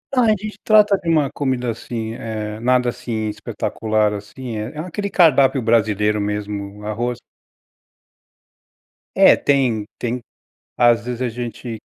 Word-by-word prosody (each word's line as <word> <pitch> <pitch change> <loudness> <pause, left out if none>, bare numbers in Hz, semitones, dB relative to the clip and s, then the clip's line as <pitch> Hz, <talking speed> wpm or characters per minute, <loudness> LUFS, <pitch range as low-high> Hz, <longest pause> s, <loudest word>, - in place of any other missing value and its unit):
A 250 - +4
gente 215 0 -1
trata 210 -2 +5
de 170 - -4
uma 150 -4 +3
comida, 130 -4 -2
assim, 115 0 -5
eh, 110 -2 -5
nada 125 0 +2
assim, 110 -2 -4
eh, - - -1
espetacular, 110 0 -1
assim, 110 +4 -7
é 105 +2 -4
é 150 - -6
aquele 190 +5 -4
cardápio 140 -7 +4
brasileiro 105 -2 +2
mesmo 105 0 -4
arroz 120 +3 -2 2.0
É - - +8
tem 125 -7 +1
tem 120 +1 -3 0.6
às 120 -1 +4
vezes 125 -1 -4
a - - +1
gente 120 0 -6
120 Hz, 135 wpm, -20 LUFS, 110-135 Hz, 2.0 s, É